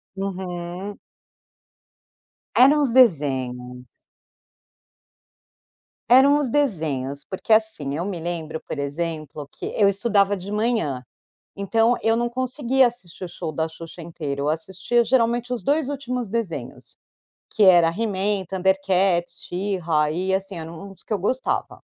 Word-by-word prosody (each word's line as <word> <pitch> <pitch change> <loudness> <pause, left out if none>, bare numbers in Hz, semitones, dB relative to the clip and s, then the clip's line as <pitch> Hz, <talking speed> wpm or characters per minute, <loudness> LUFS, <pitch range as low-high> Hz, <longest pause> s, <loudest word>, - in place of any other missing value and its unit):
Uhum. 185 0 -5 1.6
Eram 285 +4 +6
os 265 -5 +1
desenhos. 130 - +2 2.3
Eram 270 +4 +7
os 290 -4 0
desenhos. 155 - 0
Porque, 190 +8 -1
assim, 215 -11 +1
eu 170 - -2
me 190 -4 -4
lembro, 160 -2 -4
por - - -4
exemplo, 150 0 -4
que - - -8
eu 205 - +5
estudava 200 0 +2
de 195 +1 -8
manhã, 210 - 0 0.5
então 225 +4 +2
eu 225 0 +3
não 240 +1 0
conseguia 255 +1 +1
assistir 190 -7 -10
o - - -6
show 165 -2 -5
da 160 +2 -1
Xuxa 165 +1 -10
inteiro. 150 -4 -5
Eu 145 - 0
assistia 190 +9 0
geralmente 240 0 +1
os 245 - -3
2 290 0 +1
últimos 250 -4 -3
desenhos, 220 -4 -5 0.5
que 220 - 0
era 175 -3 +7
He-Man, 200 0 -1
Thundercats, 190 -1 +1
She-Ra, 175 -5 0
e 185 +4 -1
assim, 195 -1 -3
era 160 0 -7
um 195 +4 -9
dos 190 - -14
que - - -7
eu 210 - +1
gostava. 255 +8 -2
190 Hz, 135 wpm, -23 LUFS, 165-230 Hz, 2.3 s, Eram